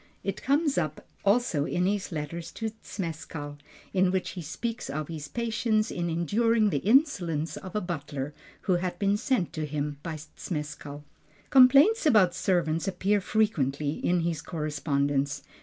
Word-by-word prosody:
It 195 - -3
comes 285 - +2
up 155 -2 -3 0.2
also 200 -8 +2
in 180 +3 0
his 200 0 -1
letters 165 +2 -5
to 220 -1 -3
Zmeskall, 160 -5 -5 0.4
in 185 -1 +4
which 185 0 -1
he 180 - -6
speaks 230 - -4
of 150 +2 -3
his 155 -3 -5
patience 225 +1 0
in 175 -1 -2
enduring 215 +6 +2
the 145 - +1
insolence 185 - +2
of 185 0 -8
a 210 - +1
butler, 145 -5 -4 0.3
who 185 -2 +2
had 175 0 -3
been 200 +1 +2
sent 210 -4 0
him 150 -1 -3
by 165 -1 -4 0.2
Zmeskall. 150 -2 -5 0.5
Complaints 280 - +7
about 205 -10 +5
servants 170 -3 0
appear 195 +2 +1
frequently 150 - +1
in 175 +3 0
his 165 -2 -1
correspondence. 145 -3 -1
175 Hz, 145 wpm, -28 LUFS, 150-210 Hz, 0.5 s, Complaints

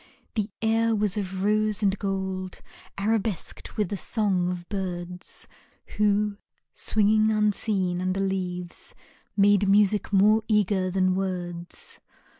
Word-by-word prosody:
The 215 -2 -1
air 225 0 +2
was 210 -2 +1
of 190 -2 -3
rose 215 +1 +2
and 195 -1 +3
gold 190 -2 -3 0.4
Arabesqued 210 -2 -2
with 210 -4 0
the 200 - -3
song 190 -3 0
of 175 -1 -5
birds 180 -2 -4 0.5
Who, 210 0 +2 0.4
swinging 215 0 +2
unseen 205 -4 +1
under 185 +1 -1
leaves, 180 -2 -3 0.4
Made 200 0 +4
music 205 +1 +4
more 210 +3 +5
eager 200 -3 +2
than 185 0 +2
words. 180 -2 -3
195 Hz, 115 wpm, -26 LUFS, 185-210 Hz, 0.5 s, more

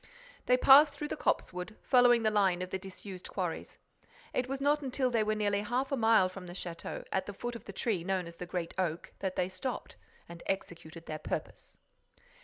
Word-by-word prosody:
They 250 - +5
passed 280 +3 +8
through 295 +1 -5
the - - -2
copsewood, 180 -7 -1
following 245 -2 +5
the 215 - +3
line 190 -4 +2
of 185 - -7
the 190 - -2
disused 190 -1 -9
quarries. 180 -4 -4 0.6
It 255 0 -1
was 270 0 -2
not 290 +2 +2
until 260 -1 0
they 230 -2 +2
were 215 0 0
nearly 205 -1 +1
half 250 +6 -1
a - - +2
mile 220 -5 +5
from 185 0 -9
the 175 - -8
château, 170 -2 -6
at 190 0 -1
the 205 - -5
foot 240 +3 -4
of 230 - -9
the - - -7
tree 195 -2 -1
known 190 -1 -1
as 170 0 -10
the 180 - -6
Great 175 -2 -3
Oak, 170 -3 -2
that 190 -1 -2
they 180 - +1
stopped—and 185 -4 -7
executed 170 -3 -4
their 155 0 -5
purpose." - - -5
200 Hz, 205 wpm, -31 LUFS, 180-245 Hz, 0.6 s, passed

